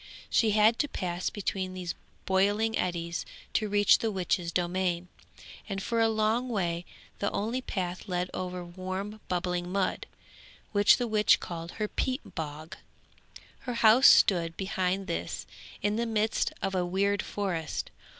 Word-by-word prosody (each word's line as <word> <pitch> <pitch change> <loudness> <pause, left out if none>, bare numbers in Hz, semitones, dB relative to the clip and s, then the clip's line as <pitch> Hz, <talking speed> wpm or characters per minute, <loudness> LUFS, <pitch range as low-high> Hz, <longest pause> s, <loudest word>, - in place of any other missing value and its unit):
She 225 - +4
had 220 +2 +5
to 290 - +2
pass 180 -8 -2
between 190 -2 -3
these 180 -2 -4 0.3
boiling 205 +4 +2
eddies 170 -1 -2 0.3
to 215 -1 +1
reach 205 0 +5
the 225 - 0
witch's 180 -3 -1
domain, 175 0 -1 0.6
and 195 -1 -2
for 230 +4 -1
a 225 - +4
long 220 +3 +1
way 175 -6 -1 0.3
the 200 - +1
only 230 +5 -2
path 185 -5 -4
led 180 -1 -2
over 180 -1 -4
warm 185 +4 -5
bubbling 180 0 -2
mud, 195 -1 -1 0.6
which 205 -1 +6
the 245 - -1
witch 215 -1 +4
called 170 -1 -6
her 215 -1 -2
'peat 260 +6 -3
bog.' 155 +1 -6 0.8
Her 245 -2 -5
house 235 +3 +7
stood 170 -4 +5
behind 190 0 -1
this 85 - -4 0.4
in 205 +1 +1
the 235 0 0
midst 220 0 +1
of 195 0 -1
a 185 -1 +1
weird 195 +3 +1
forest. 180 -6 -3
190 Hz, 150 wpm, -29 LUFS, 175-215 Hz, 0.8 s, house